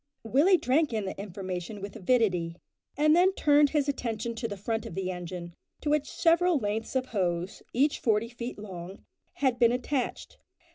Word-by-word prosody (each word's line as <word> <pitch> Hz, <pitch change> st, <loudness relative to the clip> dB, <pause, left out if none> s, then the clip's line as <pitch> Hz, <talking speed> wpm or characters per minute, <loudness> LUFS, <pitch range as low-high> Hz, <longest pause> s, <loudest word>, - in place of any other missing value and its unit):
Willie 290 Hz, -, +4 dB
drank 290 Hz, -1 st, +1 dB
in 215 Hz, -3 st, -1 dB
the 190 Hz, -, -4 dB
information 190 Hz, 0 st, -5 dB
with 200 Hz, 0 st, -7 dB
avidity, 185 Hz, -6 st, +1 dB, 0.4 s
and 305 Hz, +1 st, +5 dB
then 370 Hz, +2 st, +4 dB
turned 290 Hz, -1 st, +5 dB
his 295 Hz, -1 st, +1 dB
attention 235 Hz, -4 st, -2 dB
to 230 Hz, +1 st, -3 dB
the 205 Hz, -, -6 dB
front 220 Hz, +3 st, -2 dB
of -, -, -8 dB
the 185 Hz, -1 st, -2 dB
engine, 175 Hz, -1 st, -6 dB, 0.3 s
to 295 Hz, -, -1 dB
which 295 Hz, -2 st, +1 dB
several 340 Hz, 0 st, +3 dB
lengths 220 Hz, +1 st, -3 dB
of 260 Hz, -1 st, +1 dB
hose, 180 Hz, -5 st, -2 dB
each 280 Hz, +5 st, +2 dB
forty 220 Hz, 0 st, +1 dB
feet 240 Hz, 0 st, -6 dB
long, 190 Hz, -2 st, -9 dB, 0.3 s
had 260 Hz, -3 st, 0 dB
been 235 Hz, -1 st, +5 dB
attached. 250 Hz, +2 st, -3 dB
230 Hz, 175 wpm, -28 LUFS, 195-285 Hz, 0.4 s, and